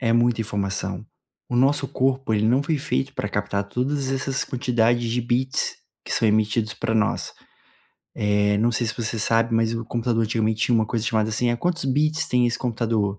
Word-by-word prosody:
Eh, 120 Hz, -, 0 dB
é 115 Hz, -, +3 dB
muita 120 Hz, -1 st, +2 dB
informação. 100 Hz, -1 st, -3 dB, 0.4 s
O 120 Hz, -, -1 dB
nosso 140 Hz, +2 st, +3 dB
corpo, 130 Hz, -3 st, 0 dB
ele 105 Hz, +1 st, +2 dB
não 130 Hz, +5 st, +3 dB
foi 155 Hz, +1 st, 0 dB
feito 65 Hz, -, -2 dB
para -, -, -3 dB
captar 100 Hz, 0 st, -1 dB
todas 135 Hz, +5 st, -2 dB
essas 135 Hz, 0 st, -1 dB
quantidades 120 Hz, -3 st, +1 dB
de 120 Hz, +2 st, 0 dB
bits 125 Hz, +3 st, 0 dB, 0.3 s
que -, -, -3 dB
são 115 Hz, -, +2 dB
emitidos 110 Hz, +1 st, +1 dB
para 115 Hz, -, -2 dB
nós. 105 Hz, -2 st, 0 dB, 0.8 s
Eh, 105 Hz, 0 st, +2 dB
não 115 Hz, +3 st, +2 dB
sei 120 Hz, +1 st, 0 dB
se 110 Hz, -, -2 dB
você 115 Hz, -1 st, -2 dB
sabe, 115 Hz, +1 st, +2 dB
mas 115 Hz, 0 st, +1 dB
o 115 Hz, 0 st, -4 dB
computador 115 Hz, 0 st, 0 dB
antigamente 110 Hz, 0 st, 0 dB
tinha 120 Hz, -, +2 dB
uma 110 Hz, -1 st, +2 dB
coisa 115 Hz, -1 st, -2 dB
chamada 110 Hz, -1 st, +1 dB
assim: 120 Hz, +3 st, +1 dB
"Eh, 120 Hz, -, 0 dB
quantos 175 Hz, +1 st, -1 dB
bits 155 Hz, +4 st, +1 dB
tem 125 Hz, -1 st, +3 dB
esse 120 Hz, -, -1 dB
computador?", 115 Hz, -4 st, -1 dB
115 Hz, 200 wpm, -23 LUFS, 110-125 Hz, 0.8 s, é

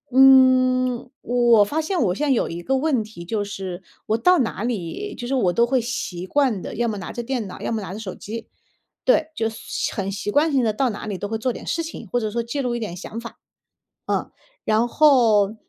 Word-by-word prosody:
嗯， 255 Hz, -2 st, +5 dB
我 240 Hz, -3 st, +4 dB
发 310 Hz, +9 st, -1 dB
现 360 Hz, +4 st, -2 dB
我 185 Hz, -5 st, +1 dB
现 300 Hz, -, -1 dB
在 275 Hz, -, +3 dB
有 250 Hz, -, +2 dB
一 170 Hz, +1 st, -5 dB
个 270 Hz, +6 st, +1 dB
问 265 Hz, -5 st, +1 dB
题 210 Hz, -5 st, -11 dB
就 205 Hz, +3 st, -1 dB
是， 190 Hz, -2 st, -6 dB, 0.2 s
我 220 Hz, -, +2 dB
到 360 Hz, +7 st, +4 dB
哪 225 Hz, -4 st, -1 dB
里， 235 Hz, -, -4 dB
就 240 Hz, -, -6 dB
是 270 Hz, -, -2 dB
我 195 Hz, -9 st, +2 dB
都 235 Hz, -, +4 dB
会 255 Hz, -1 st, +2 dB
习 195 Hz, -7 st, -4 dB
惯 255 Hz, -6 st, +1 dB
的， -, -, -6 dB
要 235 Hz, +2 st, 0 dB
么 215 Hz, -, -2 dB
拿 185 Hz, -, -6 dB
着 240 Hz, -, -4 dB
电 245 Hz, -4 st, -3 dB
脑， 185 Hz, -, -9 dB
要 -, -, -2 dB
么 220 Hz, -2 st, -1 dB
拿 190 Hz, -1 st, -6 dB
着 210 Hz, -, -6 dB
手 195 Hz, -4 st, -6 dB
机。 225 Hz, +2 st, -7 dB, 0.6 s
对， 320 Hz, -11 st, +3 dB
就 225 Hz, -1 st, 0 dB
随 225 Hz, 0 st, -4 dB
很 195 Hz, -1 st, -2 dB
习 200 Hz, +1 st, -4 dB
惯 305 Hz, +4 st, +3 dB
性 265 Hz, -3 st, +2 dB
的 220 Hz, -, +2 dB
到 260 Hz, +3 st, +1 dB
哪 210 Hz, -, -7 dB
里 200 Hz, -3 st, -3 dB
都 205 Hz, -, -4 dB
会 220 Hz, +1 st, -2 dB
做 250 Hz, +3 st, 0 dB
点 -, -, -9 dB
事 335 Hz, -, 0 dB
情， 320 Hz, -8 st, -8 dB
或 245 Hz, -, +2 dB
者 215 Hz, -2 st, -2 dB
说 235 Hz, +1 st, -1 dB
记 255 Hz, +5 st, -3 dB
录 245 Hz, -2 st, -1 dB
一 240 Hz, -, -2 dB
点 205 Hz, -6 st, -5 dB
想 215 Hz, +4 st, -7 dB
法。 230 Hz, -, -10 dB, 1.0 s
嗯， -, -, -34 dB
然 220 Hz, +2 st, +2 dB
后， 230 Hz, -8 st, +4 dB
235 Hz, 255 characters per minute, -22 LUFS, 210-260 Hz, 1.0 s, 嗯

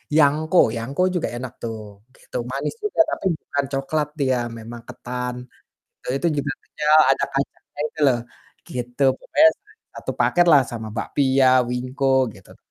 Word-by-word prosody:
yangko. 155 Hz, +3 st, +3 dB, 0.2 s
Yangko 125 Hz, +9 st, -3 dB
juga 175 Hz, -, 0 dB
enak 125 Hz, +1 st, -6 dB
tuh, 115 Hz, -1 st, -4 dB, 0.4 s
gitu. -, -, -17 dB, 0.2 s
Manis 135 Hz, -, -3 dB
juga 415 Hz, -5 st, -3 dB
tapi -, -, -4 dB
bukan 140 Hz, 0 st, -2 dB
coklat 145 Hz, +2 st, -1 dB
dia, 130 Hz, -3 st, +2 dB, 0.2 s
memang 115 Hz, +1 st, -9 dB
ketan. 125 Hz, 0 st, -5 dB, 0.7 s
Eee, 125 Hz, -, -2 dB
itu 170 Hz, -, +2 dB
juga 145 Hz, +1 st, -1 dB
pecel, 150 Hz, 0 st, 0 dB, 0.2 s
ada 135 Hz, -, +2 dB
kacangnya 140 Hz, +1 st, -4 dB
itu -, -, -14 dB
loh. 125 Hz, -2 st, +3 dB, 0.5 s
Gitu, 125 Hz, +2 st, -3 dB
pokoknya 320 Hz, +1 st, +5 dB, 0.4 s
satu -, -, -5 dB
paketlah 170 Hz, -5 st, +5 dB
sama 110 Hz, -2 st, -5 dB
bakpia, 135 Hz, +2 st, +2 dB, 0.2 s
wingko 125 Hz, +3 st, -3 dB, 0.3 s
gitu, 95 Hz, -3 st, -17 dB
enak -, -, -22 dB
135 Hz, 145 wpm, -22 LUFS, 125-150 Hz, 0.7 s, pokoknya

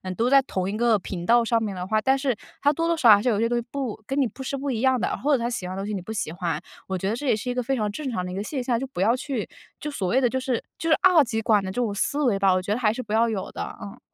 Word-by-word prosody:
都 235 Hz, +6 st, +1 dB
在 275 Hz, 0 st, +6 dB
同 190 Hz, -7 st, -2 dB
一 205 Hz, -, -3 dB
个 235 Hz, -1 st, +3 dB
频 175 Hz, -2 st, -6 dB
道 235 Hz, +3 st, +5 dB
上 230 Hz, 0 st, +2 dB
面 205 Hz, -3 st, -3 dB
的 180 Hz, 0 st, -4 dB
话， 215 Hz, +3 st, +1 dB
但 265 Hz, +3 st, +3 dB
是 265 Hz, -3 st, 0 dB, 0.3 s
他 290 Hz, -, +4 dB
多 330 Hz, +3 st, -1 dB
多 335 Hz, -, +2 dB
少 245 Hz, -7 st, +5 dB
少 210 Hz, -, +11 dB
还 -, -, -2 dB
是 -, -, -1 dB
有 210 Hz, -3 st, +1 dB
些 230 Hz, -, +2 dB
东 240 Hz, -, +1 dB
西 235 Hz, -, -7 dB
不 260 Hz, -7 st, -4 dB
跟 270 Hz, +1 st, -1 dB
你 275 Hz, -, +4 dB
不 265 Hz, -, -11 dB
是 270 Hz, -, -3 dB
不 280 Hz, +1 st, -3 dB
一 230 Hz, -, -2 dB
样 260 Hz, -1 st, +3 dB
的， 235 Hz, -, -1 dB
或 295 Hz, +3 st, 0 dB
者 270 Hz, -, +5 dB
他 235 Hz, +1 st, -1 dB
喜 195 Hz, -7 st, -4 dB
欢 185 Hz, -, -5 dB
的 195 Hz, -, -4 dB
东 205 Hz, -, -5 dB
西 215 Hz, -, -3 dB
你 195 Hz, -, -3 dB
不 200 Hz, -, -8 dB
喜 200 Hz, -7 st, -3 dB
欢。 170 Hz, -3 st, -2 dB, 0.3 s
我 190 Hz, -, -2 dB
觉 190 Hz, +2 st, -2 dB
得 220 Hz, -, 0 dB
这 290 Hz, -, -6 dB
也 250 Hz, -, +4 dB
是 220 Hz, +4 st, -5 dB
一 -, -, 0 dB
个 250 Hz, -, -1 dB
非 270 Hz, +3 st, 0 dB
常 210 Hz, -4 st, -1 dB
正 275 Hz, +6 st, -4 dB
常 185 Hz, -6 st, -2 dB
的 180 Hz, -, -5 dB
一 -, -, -5 dB
个 200 Hz, -, -3 dB
现 260 Hz, +3 st, -3 dB
象。 245 Hz, -, -3 dB
就 -, -, -2 dB
不 255 Hz, -, -5 dB
要 225 Hz, +5 st, +4 dB
去 255 Hz, -4 st, -4 dB, 0.3 s
就 300 Hz, -, -4 dB
所 200 Hz, -10 st, -2 dB
谓 245 Hz, +9 st, +3 dB
的 250 Hz, -, +4 dB
就 260 Hz, -, -1 dB
是 255 Hz, -2 st, -2 dB, 0.2 s
就 330 Hz, -, -2 dB
是 315 Hz, -, +6 dB
二 360 Hz, -5 st, +7 dB
极 230 Hz, -3 st, -2 dB
管 215 Hz, -2 st, +3 dB
的 190 Hz, -, -4 dB
这 -, -, -11 dB
种 220 Hz, -4 st, -1 dB
思 285 Hz, +9 st, -1 dB
维 230 Hz, -7 st, +2 dB
吧， 195 Hz, -1 st, +4 dB
我 185 Hz, -, +2 dB
觉 190 Hz, -, -4 dB
得 225 Hz, -, -2 dB
还 220 Hz, -4 st, +3 dB
是 255 Hz, -, -4 dB
不 215 Hz, -, -6 dB
要 230 Hz, +1 st, +4 dB
有 205 Hz, -4 st, -4 dB
的， -, -, -6 dB
嗯。 200 Hz, -1 st, -9 dB
230 Hz, 395 characters per minute, -25 LUFS, 200-265 Hz, 0.3 s, 少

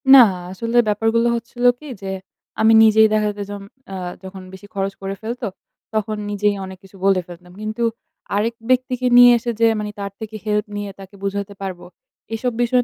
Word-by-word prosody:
না -, -, +11 dB, 0.3 s
আসলে 230 Hz, +5 st, -2 dB
ব্যাপারগুলো 225 Hz, +3 st, +2 dB
হচ্ছিল 235 Hz, +1 st, -6 dB, 0.2 s
কি 305 Hz, -, -11 dB
যে, 195 Hz, -1 st, -4 dB, 0.5 s
আমি 225 Hz, 0 st, +6 dB
নিজেই 220 Hz, 0 st, +6 dB
দেখা 215 Hz, -1 st, +2 dB
যাইজম 205 Hz, 0 st, -6 dB, 0.3 s
আ -, -, -4 dB, 0.3 s
যখন 190 Hz, 0 st, -8 dB
বেশি 190 Hz, +2 st, -11 dB
খরচ 195 Hz, 0 st, -1 dB
করে 195 Hz, 0 st, -3 dB
ফেলত, 235 Hz, +3 st, -5 dB, 0.5 s
তখন 215 Hz, 0 st, -1 dB
নিজেই 205 Hz, 0 st, +1 dB
অনেক 190 Hz, 0 st, -9 dB
কিছু 195 Hz, 0 st, -16 dB
বলে 195 Hz, -2 st, +4 dB
ফেলতাম। 180 Hz, 0 st, -12 dB
কিন্তু 215 Hz, +2 st, -3 dB, 0.5 s
আরেক 225 Hz, +3 st, 0 dB
ব্যক্তিকে 255 Hz, 0 st, +1 dB
নিয়ে 245 Hz, 0 st, +10 dB
এসে 235 Hz, +1 st, -2 dB
যে 230 Hz, -, +5 dB
মানি 210 Hz, 0 st, -3 dB
তার 200 Hz, -1 st, -4 dB
থেকে 220 Hz, 0 st, -7 dB
হেল্প 210 Hz, 0 st, +1 dB
নিয়ে 205 Hz, -1 st, -4 dB
তাকে 195 Hz, +1 st, -12 dB
বুঝাইতে 200 Hz, 0 st, -3 dB
পারব, 190 Hz, -2 st, -4 dB, 0.6 s
এসব 250 Hz, +2 st, -1 dB
বিষয় 245 Hz, +1 st, +3 dB
210 Hz, 180 wpm, -21 LUFS, 195-230 Hz, 0.6 s, না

